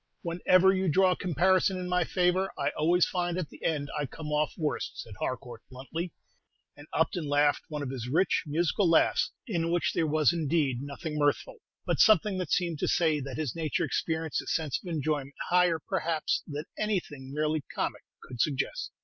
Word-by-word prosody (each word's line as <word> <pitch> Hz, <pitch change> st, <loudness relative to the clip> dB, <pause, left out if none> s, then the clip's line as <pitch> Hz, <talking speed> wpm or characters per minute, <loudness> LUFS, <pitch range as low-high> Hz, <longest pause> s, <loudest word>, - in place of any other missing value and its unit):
"Whenever 185 Hz, +2 st, +4 dB
you 190 Hz, -1 st, 0 dB
draw 185 Hz, +4 st, +4 dB
a -, -, +1 dB
comparison 185 Hz, +3 st, +2 dB
in 180 Hz, 0 st, -4 dB
my 180 Hz, 0 st, +2 dB
favor, 180 Hz, +2 st, +1 dB
I -, -, 0 dB
always 170 Hz, +3 st, +3 dB
find 175 Hz, -1 st, -1 dB
at 180 Hz, -5 st, -3 dB
the -, -, -14 dB
end 150 Hz, -3 st, 0 dB
I 145 Hz, -2 st, -1 dB
come 150 Hz, +4 st, -7 dB
off 150 Hz, -1 st, +1 dB
worst," 155 Hz, -3 st, -3 dB
said 110 Hz, -, -7 dB
Harcourt, 125 Hz, -3 st, -4 dB
bluntly; 160 Hz, +7 st, -5 dB, 0.6 s
and 145 Hz, +1 st, -13 dB
Upton 160 Hz, 0 st, 0 dB
laughed 145 Hz, 0 st, +2 dB
one 150 Hz, -2 st, -4 dB
of 130 Hz, -, -4 dB
his 125 Hz, -3 st, -5 dB
rich, 175 Hz, +8 st, +2 dB
musical 170 Hz, +4 st, +1 dB
laughs, 165 Hz, -, +3 dB, 0.2 s
in 170 Hz, -9 st, -1 dB
which 175 Hz, 0 st, +1 dB
there 160 Hz, -, +1 dB
was 155 Hz, 0 st, +3 dB
indeed 150 Hz, -6 st, 0 dB
nothing 150 Hz, +2 st, -5 dB
mirthful, 145 Hz, -1 st, 0 dB, 0.3 s
but -, -, 0 dB
something 210 Hz, -3 st, +5 dB
that 180 Hz, -, -3 dB
seemed 170 Hz, -4 st, 0 dB
to -, -, 0 dB
say 160 Hz, -3 st, +2 dB
that 135 Hz, -2 st, -6 dB
his 155 Hz, -6 st, -2 dB
nature 160 Hz, -4 st, -1 dB
experienced 160 Hz, -2 st, -1 dB
a -, -, -14 dB
sense 155 Hz, -5 st, -1 dB
of -, -, -10 dB
enjoyment 150 Hz, -3 st, -2 dB, 0.2 s
higher, 180 Hz, -2 st, +4 dB
perhaps, 160 Hz, 0 st, -1 dB
than 150 Hz, 0 st, -4 dB, 0.2 s
anything 160 Hz, -11 st, -2 dB
merely 150 Hz, +1 st, 0 dB
comic -, -, -2 dB, 0.2 s
could 125 Hz, -3 st, -4 dB
suggest. 150 Hz, -, -1 dB
160 Hz, 185 wpm, -29 LUFS, 145-180 Hz, 0.6 s, something